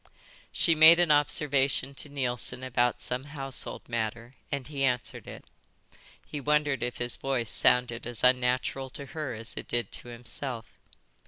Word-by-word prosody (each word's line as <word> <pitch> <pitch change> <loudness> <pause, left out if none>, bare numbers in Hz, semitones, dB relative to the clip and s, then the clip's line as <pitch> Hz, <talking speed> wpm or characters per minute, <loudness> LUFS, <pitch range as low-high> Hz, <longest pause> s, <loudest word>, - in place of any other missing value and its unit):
She 165 - +3
made 160 +2 +8
an 175 -3 +3
observation 140 -2 +3
to 145 - -6
Neilson 130 -2 -1
about 125 -1 0
some 125 +2 -1
household 135 -3 -5
matter 115 +1 -3 0.2
and 140 -2 -3
he 140 -2 -3
answered. 125 -2 -2 0.8
He 145 - -6
wondered 150 -1 +1
if 120 0 -3
his 120 0 -2
voice 130 -5 -1
sounded 120 -1 +2
as 120 -2 -4
unnatural 125 +1 +1
to 140 - -7
her 140 -3 -5
as 115 +2 -7
it - - -7
did 120 -4 -2
to - - -8
himself. 120 0 -6
130 Hz, 150 wpm, -28 LUFS, 120-145 Hz, 0.8 s, made